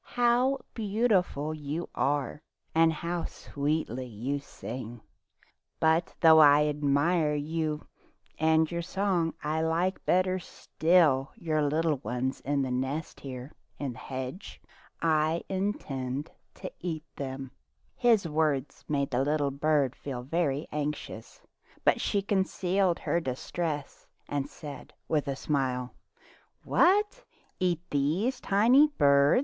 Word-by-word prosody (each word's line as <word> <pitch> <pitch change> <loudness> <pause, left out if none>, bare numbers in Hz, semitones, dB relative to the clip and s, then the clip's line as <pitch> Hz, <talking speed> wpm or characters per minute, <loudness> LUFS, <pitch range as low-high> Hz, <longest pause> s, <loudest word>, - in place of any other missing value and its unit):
"How 245 +3 +3 0.2
beautiful 200 -9 +1
you 155 +2 -4
are, 145 +1 -1 0.3
and 165 0 +5
how 170 +2 -3
sweetly 140 -4 -3
you 125 +6 -3
sing! 120 -4 -8 0.8
But 160 +1 +2
though 160 -1 +8
I 150 0 +7
admire 150 +2 +2
you 155 +1 -2 0.5
and 160 +1 +3
your 170 0 -2
song, 180 -2 0
I 155 +1 0
like 170 +4 0
better 185 +1 +2
still 160 -5 +2
your 155 -3 0
young 155 -2 +1
ones 125 +4 -2
in 140 0 0
the 130 - -2
nest 135 +5 -3
here 130 0 -7 0.3
in 140 -3 -3
the 125 - -12
hedge. 130 +7 -6 0.4
I 160 0 +2
intend 145 -8 -3 0.2
to - - -7
eat 160 -3 -4
them." 135 -1 -5 0.4
His 230 -7 +3
words 150 -3 -1
made 140 -2 0
the 125 +1 +2
little 145 -1 +1
bird 145 -1 +1
feel 130 -4 -6
very 145 0 0
anxious, 145 -6 -5 0.4
but - - +4
she 200 -1 0
concealed 190 -2 +1
her 170 - 0
distress 145 +1 -4 0.2
and 145 -1 -2
said 150 -3 -10
with 150 -2 0
a 140 - -1
smile: 130 -3 -1 0.4
" - - -26 0.3
What! 415 +7 +3 0.4
eat 175 -3 +1
these 170 - +1
tiny 240 +9 +5
birds 140 - +5
155 Hz, 125 wpm, -29 LUFS, 140-175 Hz, 0.8 s, though